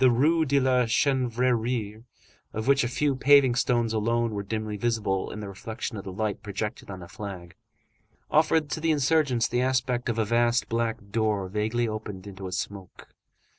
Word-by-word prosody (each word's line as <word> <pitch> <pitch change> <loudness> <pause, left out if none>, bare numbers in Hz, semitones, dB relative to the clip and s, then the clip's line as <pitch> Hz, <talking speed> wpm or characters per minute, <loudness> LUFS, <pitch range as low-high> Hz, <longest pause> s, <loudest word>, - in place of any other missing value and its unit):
The 130 - +7
Rue 155 +7 +3
de 140 0 +3
la 125 -2 +2
Chanvrerie, 120 -3 0 0.5
of 110 +1 -3
which 140 0 +4
a - - +1
few 140 +3 0
paving 135 -1 +5
stones 120 -2 +1
alone 115 +1 +1
were 100 -1 -3
dimly 110 +1 -3
visible 105 -3 -1
in 105 - -7
the 105 - -6
reflection 110 +4 -6
of 100 - -6
the 95 - -6
light 105 +1 -2
projected 105 +1 -5
on 95 -2 -7
the 85 - -9
flag, 90 -3 -8 0.8
offered 155 -1 +3
to - - -2
the 165 +1 0
insurgents 145 -5 +2
the 120 +1 0
aspect 125 -1 0
of 115 - -1
a 110 - +2
vast 120 +2 +2
black 115 -3 -2
door 105 -3 0
vaguely 110 +4 0
opened 105 -3 -6
into 95 -1 -7
a - - -7
smoke. 95 0 -6
115 Hz, 180 wpm, -26 LUFS, 105-130 Hz, 0.8 s, The